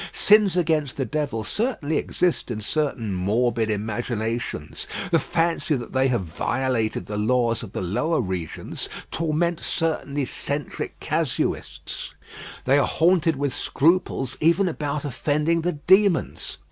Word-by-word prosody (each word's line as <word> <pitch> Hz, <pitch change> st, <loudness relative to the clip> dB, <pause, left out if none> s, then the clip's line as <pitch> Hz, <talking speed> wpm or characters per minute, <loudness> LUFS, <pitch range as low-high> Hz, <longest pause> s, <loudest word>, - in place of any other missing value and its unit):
Sins 205 Hz, -4 st, +5 dB
against 155 Hz, -6 st, +1 dB
the 135 Hz, -, 0 dB
devil 140 Hz, -3 st, -2 dB
certainly 190 Hz, -, 0 dB
exist 180 Hz, -6 st, 0 dB
in 115 Hz, -3 st, -3 dB
certain 115 Hz, -3 st, -1 dB
morbid 110 Hz, +5 st, +1 dB
imaginations. 110 Hz, -4 st, -3 dB, 0.2 s
The -, -, +5 dB
fancy 165 Hz, -1 st, +1 dB
that 120 Hz, -3 st, -6 dB
they 130 Hz, 0 st, +3 dB
have 120 Hz, -5 st, +1 dB
violated 115 Hz, +7 st, -1 dB
the 105 Hz, 0 st, -4 dB
laws 115 Hz, +1 st, +2 dB
of 110 Hz, -, -9 dB
the -, -, -3 dB
lower 125 Hz, -, 0 dB
regions 90 Hz, -7 st, -3 dB, 0.2 s
torments 165 Hz, +1 st, 0 dB
certain 155 Hz, -3 st, -1 dB
eccentric 140 Hz, +1 st, -3 dB
casuists; -, -, -2 dB, 0.5 s
they 135 Hz, +2 st, +5 dB
are -, -, +2 dB
haunted 165 Hz, -1 st, +3 dB
with 140 Hz, -1 st, -1 dB
scruples 160 Hz, -5 st, +1 dB
even 170 Hz, +5 st, +3 dB
about 150 Hz, -3 st, -2 dB
offending 150 Hz, +5 st, 0 dB
the 175 Hz, +2 st, 0 dB
demons. 190 Hz, +4 st, +2 dB
140 Hz, 130 wpm, -24 LUFS, 115-165 Hz, 0.5 s, Sins